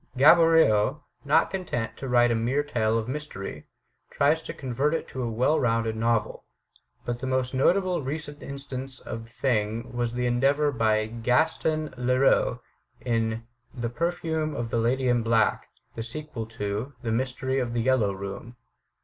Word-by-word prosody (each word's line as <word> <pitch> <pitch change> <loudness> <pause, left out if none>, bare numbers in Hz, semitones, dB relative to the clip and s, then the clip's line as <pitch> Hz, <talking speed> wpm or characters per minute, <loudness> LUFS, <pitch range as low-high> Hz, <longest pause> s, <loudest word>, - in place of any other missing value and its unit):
Gaboriau, 150 -4 +5 0.2
not 145 +1 +3
content 160 -12 -3
to 135 - -5
write 120 -1 +4
a - - +2
mere 125 +6 +1
tale 115 -6 0
of 110 -1 -2
mystery, 125 - -6 0.4
tried 145 +3 +3
to 160 - -7
convert 135 +4 -1
it - - -3
into 130 - -6
a 120 - -1
well 125 +8 +2
rounded 115 -2 +1
novel. 115 -1 0 0.6
But 120 0 -3
the 130 - -4
most 130 0 0
notable 180 +6 +2
recent 145 +1 -5
instance 135 -1 -6
of 115 +1 -7
the - - -19
thing 115 -1 -1
was 120 -1 -1
the 125 0 -1
endeavor 135 +5 +2
of 110 -2 0
Gaston 155 +4 +1
Leroux 125 +2 +2 0.4
in 115 -1 -1 0.3
"The 120 -2 -2
Perfume 160 +2 -2
of 115 -1 -4
the 115 - +1
Lady 125 +3 +1
in 120 -1 +3
Black," 115 -1 +1 0.2
the 115 - -5
sequel 120 -1 -6
to 110 +4 -4
"The 115 - -1
Mystery 130 +2 -1
of 120 -2 -2
the 120 - +1
Yellow 120 -5 +2
Room." 100 +5 -7
125 Hz, 160 wpm, -26 LUFS, 115-145 Hz, 0.6 s, Gaboriau